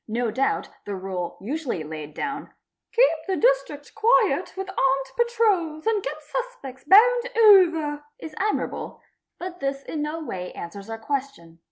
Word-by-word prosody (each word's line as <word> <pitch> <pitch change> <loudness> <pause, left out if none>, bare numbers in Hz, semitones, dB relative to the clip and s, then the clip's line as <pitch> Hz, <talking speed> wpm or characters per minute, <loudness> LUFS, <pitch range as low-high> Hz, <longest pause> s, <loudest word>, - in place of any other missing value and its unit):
No 230 +1 -1
doubt 270 +4 0 0.2
the 205 - -4
rule 185 -2 -5
usually: 250 - -3
laid 150 -1 -8
down, 275 0 -4 0.2
'' - - -62
Keep 480 -8 +5
the 380 -1 0
District 460 -13 +1
quiet 455 +3 +3
with 385 0 -4
armed 270 -7 +1
patrols 415 -10 +1
and 440 -2 +2
get - - -4
suspe - - -6
ts 265 - -24
bound 480 +7 +6
over'', 335 -9 +5
is 315 - -9
admirable; 420 +2 -2 0.4
but 360 0 -7
this 275 0 -2
in 305 - -4
no 300 +2 -3
way 180 -10 -6
answers 200 +5 -8
our 225 - -4
question. 225 - -5
295 Hz, 160 wpm, -24 LUFS, -, 0.4 s, bound